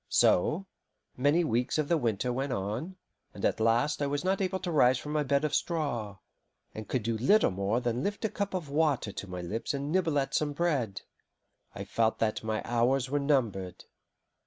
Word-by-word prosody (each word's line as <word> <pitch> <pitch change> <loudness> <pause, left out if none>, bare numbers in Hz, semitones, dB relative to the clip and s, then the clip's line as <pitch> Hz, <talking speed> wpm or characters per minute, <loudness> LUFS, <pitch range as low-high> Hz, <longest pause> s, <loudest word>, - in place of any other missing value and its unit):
So, 155 - +3 0.5
many 145 +7 +3
weeks 125 -2 0
of 155 -2 0
the 170 - +3
winter 120 -3 0
went 135 +2 -2
on, 115 - -3 0.4
and - - -3
at - - +1
last 120 +7 +2
I 145 - +1
was 145 +2 -2
not 190 +1 +1
able 190 0 0
to 180 -2 -3
rise 130 -5 +4
from 150 - -6
my 150 0 +1
bed 140 +1 +1
of 150 - -2
straw, 120 - -1 0.6
and 110 -1 -7
could 125 -4 -1
do 115 +1 -1
little 205 - +4
more 100 +5 0
than 120 0 -1
lift 205 +7 -2
a - - +1
cup 200 -1 -3
of 175 -5 -3
water 145 -6 +1
to 100 - -7
my 90 -1 -5
lips 110 +10 -3
and 140 +2 -3
nibble 170 -4 +1
at 135 0 0
some 150 -1 0
bread. 140 - -1 0.7
I - - -5
felt 115 -1 0
that 110 -1 -1
my 110 -1 -2
hours 125 +2 +1
were 145 - +2
numbered. 115 -11 -1
135 Hz, 200 wpm, -29 LUFS, 115-155 Hz, 0.7 s, rise